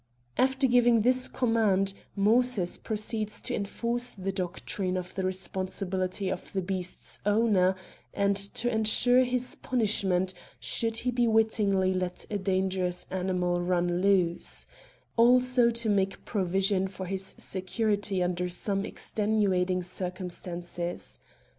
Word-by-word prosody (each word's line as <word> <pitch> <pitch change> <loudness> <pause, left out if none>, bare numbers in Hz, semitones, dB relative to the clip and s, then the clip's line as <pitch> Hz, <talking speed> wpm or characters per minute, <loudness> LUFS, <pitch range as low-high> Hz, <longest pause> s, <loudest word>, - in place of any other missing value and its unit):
After 265 +1 +2
giving 240 -2 +4
this 255 +1 +3
command, 215 -6 +1 0.2
Moses 215 -2 +3
proceeds 215 0 -2
to - - -3
enforce 235 +4 -1
the 195 -1 -3
doctrine 185 0 -3
of 180 0 -6
the 190 - -3
responsibility 185 +1 -2
of 190 - -5
the 190 - 0
beast's 185 -1 -3
owner, 205 -3 +3 0.4
and 200 0 +1
to 200 +4 -2
ensure 235 +3 +4
his 250 0 0
punishment, 195 -6 0 0.3
should 225 -1 0
he 245 0 +1
wittingly 210 -4 +2
let 180 -1 -3
a 205 - -1
dangerous 185 -1 -1
animal 180 -1 0
run 175 0 0
loose; 185 -3 +2 0.5
also 250 +1 +5
to 235 -1 +1
make 195 -2 0
provision 190 -1 +1
for 190 0 -7
his 190 +1 -3
security 200 0 -1
under 180 0 -1
some 195 +2 -1
extenuating 190 -4 0
circumstances. 175 -1 -5
195 Hz, 115 wpm, -28 LUFS, 185-225 Hz, 0.5 s, also